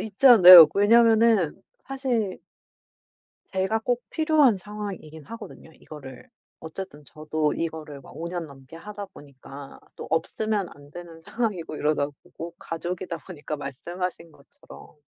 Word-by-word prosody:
있지 220 +5 -1
않아요. 180 -9 +11
왜냐하면은 220 -3 +3 0.2
사실 250 -7 -3 1.1
제가 190 +4 -1
꼭 245 +1 -2
필요한 310 -8 +3
상황이긴 190 -7 -9
하거든요. 230 -5 -11
이거를 150 - -13 0.3
어쨌든 160 -2 -9
저도 155 0 -3
이거를 155 -3 -6
막 - - -16
5 170 +1 -6
년 175 -1 -5
넘게 135 +1 -15
하다 205 +3 -9
보니까 140 -3 -13 0.2
또 - - -8
없으면 205 +4 -2
안 145 0 -17
되는 170 0 -11
상황이고 195 -8 -4
이러다 150 -1 0 0.2
보고 170 +1 -10
가족이다 175 +1 -5
보니까, 155 -4 -7
말씀하신 170 +5 -6
것처럼. 285 - -17
175 Hz, 300 characters per minute, -24 LUFS, 155-215 Hz, 1.1 s, 않아요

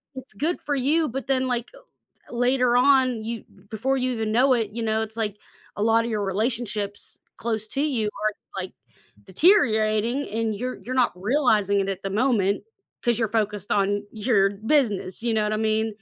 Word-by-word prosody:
it's 260 0 -8
good 325 +5 -2
for 290 - -1
you 300 +5 +2
but, 270 +2 -5
then, 265 -1 +2
like, 240 -1 -2
uh, - - -14 0.5
th - - -13 0.2
later 255 -2 +2
on, 255 -3 +3
you 230 0 -5 0.3
before 265 +5 0
you 255 0 0
even 220 -3 -2
know 255 +4 +4
it, 225 -4 0
you 230 - -2
know, 220 0 +1
it's, 220 0 -5
like, 210 -2 -3 0.4
a - - +1
lotta 230 +1 +3
your 210 -2 -1
relationships 215 -2 -2 0.2
close 220 -2 -2
to 275 - +1
you 220 -2 0
are, 215 0 +2 0.3
like, 185 - -6 0.6
deteriorating 225 - +3 0.2
and 225 - 0
you're 255 0 -3
you're 255 +1 -3
not - - -1 0.2
realizing 215 -8 +3
it 195 - -3
at 185 - -27
the 195 - -2
moment 205 -7 +2 0.4
'cause 235 -2 +1
you're 225 - +1
focused 205 -2 -5
on 205 +1 0 0.2
your 220 -6 +4 0.3
business, 215 -7 +1
you 235 - +1
know 215 -1 +2
what 215 - -1
I - - 0
mean? 220 +1 +1
225 Hz, 190 wpm, -24 LUFS, 215-255 Hz, 0.6 s, know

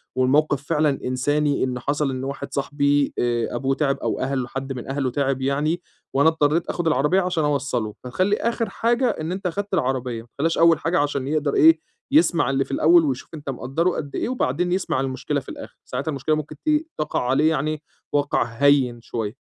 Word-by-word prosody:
والموقِف 140 +2 +2
فعلًا 150 0 +2 0.2
إنساني 145 +3 +1
إن 125 -1 -2
حصل 145 +3 -1
إن 130 0 -4
واحد 140 +1 -5
صاحبي 145 0 +1
آآ 120 -1 0
أبوه 135 0 0
تِعَِب 140 -2 0
أو - - -2
أهل 130 -1 -1
حد 135 +2 -5
من 125 -2 -7
أهله 135 -1 -1
تِعِب 135 0 0
يعني 145 +6 0 0.3
وأنا 140 +4 +5
اضطريت 160 0 +1
آخُد 175 -2 -2
العربية 150 +5 +3
عشان 180 -3 0
أوصّله، 140 -7 -1
فتخلّي 185 +11 +1
آخِر 230 -2 -1
حاجة 235 +5 +1
إن 160 -6 -3
أنت 185 0 -3
أخدت 200 +3 -4
العربية، 130 -7 -1
ما 115 - -17
تخلّيهاش 165 +4 0
أول 165 -2 +5
حاجة 165 0 +1
عشان 145 -2 -1
يقدر 150 -1 0
إيه، 160 +1 +6 0.3
يسمع 275 - +4
اللي 135 0 +1
في - - -11
الأول 165 +4 +5
ويشوف 130 -3 -3
أنت 145 -3 -7
مقدّره 135 +7 -1
قد 145 -5 -4
إيه - - -1
وبعدين 180 - 0
يسمع 185 -7 0
المشكلة 135 +2 -2
في 135 - -12
الآخِر. - - -9
ساعتها 130 +5 -3
المشكلة 155 +1 0
ممكن 155 0 -5
ت - - +1 0.3
تَقَع 150 0 -1
عليه 145 +4 +3
يعني 155 0 -1 0.3
وَقْع 145 0 +2
هيِّن 125 0 +2
شوية. 110 -1 -4
145 Hz, 190 wpm, -23 LUFS, 135-160 Hz, 0.3 s, إيه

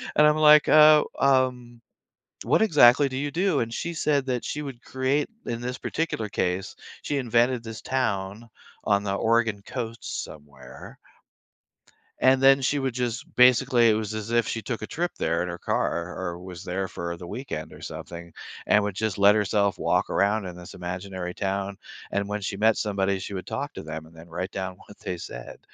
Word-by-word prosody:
and 150 - +6
I'm 150 0 +3
like, 150 -1 +7
uh, 155 0 +8 0.2
um, 125 -3 +1 0.6
"What 130 - +2
exactly 145 - +6
do 130 - -5
you 145 +1 -2
do?" 175 -1 +1
And 115 0 -3
she 170 +7 -3
said 145 -3 +1
that 125 -2 -2
she 150 - -3
would 135 -4 -8
create 130 +3 0 0.2
in 115 -1 -3
this 125 +1 -4
particular 135 -10 -3
case, 95 -1 -2 0.3
she 145 - -1
invented 120 -1 +1
this 115 -1 -8
town 110 -4 -2 0.4
on 100 -1 +2
the 100 -1 -2
Oregon 115 -1 +1
Coast 115 -2 -5
somewhere. 70 -4 -13 1.2
And 130 0 +4
then 135 0 +6
she 145 +3 +1
would 135 -3 -2
just 125 -1 -4
basically, 125 -1 +5
it - - +3
was 110 0 -3
as 110 +1 -5
if 120 0 +2
she 115 - -3
took 120 -4 -4
a 110 - -5
trip 175 +2 -2
there 85 +1 0
in 90 - -4
her 85 0 -6
car 85 +1 -2
or 85 -2 -4
was 90 -1 -9
there 95 +2 -3
for, 85 -1 -5
uh, - - -6
the 85 - -9
weekend 85 - -6
or - - -13
something, 85 -1 -8 0.3
and 105 - +4
would 100 -2 -3
just 105 -1 -2
let 100 +1 +6
herself 100 -1 +1
walk - - +1
around 100 +1 +1
in 90 - -8
this 90 0 -11
imaginary 90 0 -5
town, 100 0 -3 0.3
and 100 0 -1
when 105 +1 -3
she 100 0 -4
met 110 +1 +4
somebody, 100 -2 -1
she 100 +1 -6
would 90 - -5
talk - - -4
to - - -8
them 80 0 -7
and 80 - -19
then 80 +1 -13
write 90 +3 -4
down 95 -1 -5
what 105 - -14
they 90 - -4
said. - - -9
110 Hz, 200 wpm, -25 LUFS, 95-130 Hz, 1.2 s, uh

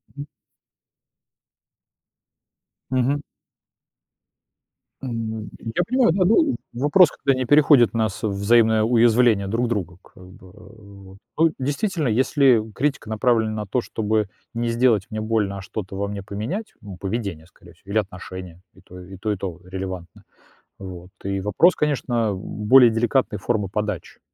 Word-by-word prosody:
Мгм. 145 0 -7 2.6
Мгм. 130 +3 0 1.8
М, 110 -4 -5
я 120 +11 -2
понимаю, 255 -7 +3
да, 190 -1 +2
ну 280 - +3 0.2
в 120 - -8
вопрос 150 +5 +5
когда 135 -2 0
не 130 - -1
переходит 145 -4 +5
нас 110 -1 -2
во 110 - +1
взаимное 110 +2 +3
уязвление 115 -3 +3
друг 115 +4 0
друга 90 -7 -3
как 90 - -18
бы 95 0 -16
вот. 100 -2 -15 0.2
Ну, 165 0 +4
действительно, 145 - -1
если 130 0 +3
критика 140 -4 -2
направлена 110 -1 +1
на 105 -1 -4
то, 120 +5 -1
чтобы 110 -3 -1 0.2
не 115 0 -2
сделать 115 -4 +2
мне 110 -1 -4
больно, 110 -3 -1
а - - -7
что-то 95 0 -7
во 100 0 -2
мне 100 -1 -6
поменять, 110 - -5
м, 100 -4 -10
поведение 95 -6 -4
скорее 85 -1 -19
всего 95 +4 -14
или 110 - 0
отношения, 90 -3 -5
и - - -20
то, 90 0 -13
и 95 +1 -11
то 105 +2 -2
и - - -3
то 90 -2 -6
релевантно, 95 -2 -7 0.6
вот. 90 -2 -9
И 100 0 -2
вопрос, 105 - +3
конечно, 120 -7 0
в 95 - -6 0.3
более 125 0 +8
деликатной 115 0 0
формы 100 -3 -1
подачи, 105 +1 -4
110 Hz, 150 wpm, -22 LUFS, 100-125 Hz, 2.6 s, более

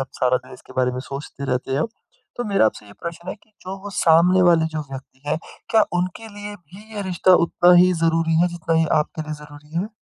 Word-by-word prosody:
आप - - -27
सारा 125 0 +3
दिन - - -10
इसके 125 - -13
बारे 125 -1 +2
में 125 - -4
सोचते 140 0 -6
रहते 130 +1 -1
हैं 140 - +1
अब। - - 0 0.5
तो 245 - -2
मेरा 195 - +3
आपसे 105 - -4
ये 100 - -13
प्रश्न 170 +1 -6
है - - -3
कि 215 - -28
जो 190 +1 -6
वो 205 - -6
सामने 180 +2 +4
वाले 165 -2 +5
जो 155 - -2
व्यक्ति 135 0 -10
हैं, 155 - +1 0.3
क्या 220 -2 +5
उनके 185 +5 -3
लिए 205 0 -8
भी 200 +6 -15
ये 205 - -3
रिश्ता 185 0 +3
उतना 175 +1 +4
ही 180 +1 +6
ज़रूरी 165 -1 +1
है 175 - +4
जितना 165 -1 -2
ये - - +3 0.2
आपके 155 +1 -4
लिए 155 - -6
ज़रूरी 145 0 -15
है? 190 +5 -1
170 Hz, 240 wpm, -22 LUFS, 145-185 Hz, 0.5 s, ही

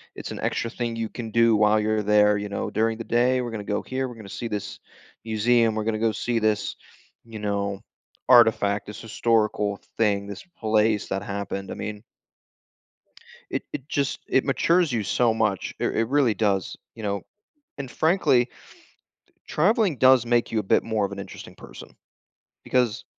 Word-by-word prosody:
it's - - -7
an - - -6
extra 115 - -1
thing 120 -1 -3
you 115 -1 -3
can 115 -2 -7
do 115 -1 +4
while 105 +1 +4
you're 110 0 0
there, 105 0 +4
you 105 - -4
know? 100 - -3
"During 110 +1 0
the 115 - -5
day, 125 +3 +2
we're 120 -1 -4
gonna 110 -2 -5
go 105 0 -1
here, 130 0 -3
we're 125 - -9
gonna 110 -3 -11
see 120 - -5
this 105 -3 -5 0.5
museum, 115 +1 +2
we're 110 - -1
gonna 110 0 -1
go 115 0 +1
see 115 +2 -1
this, 110 -1 0 0.5
you 115 -1 -9
know, 100 -1 -2 0.5
artifact, 105 -5 +5
this 105 - -8
historical 110 -3 0 0.2
thing, 100 -3 +1
this 100 -1 -8 0.2
place 110 -1 +2
that 95 - -2
happened," 100 -1 -5
I - - -5
mean 105 0 -6 1.5
it - - -2
it 135 0 -6
just 140 -2 -1
it 130 - +2
matures 165 +4 +2
you 115 -3 -1
so 115 +3 +2
much, 105 -4 -1
it - - 0
r - - +1
it 115 0 0
really 135 -5 +3
does, 100 -3 -1 0.2
you 115 - -9
know, 100 -1 -2 0.6
and 140 -2 -6
frankly, 155 -8 +2 1.0
traveling 195 - +2
does 130 -1 +5
make 120 0 +1
you 110 - +1
a - - -2
bit - - +2
more 110 -2 0
of 100 - -6
an 100 - -6
interesting 100 -1 -9
person - - -13 0.7
because 125 -2 0
110 Hz, 180 wpm, -24 LUFS, 105-120 Hz, 1.5 s, artifact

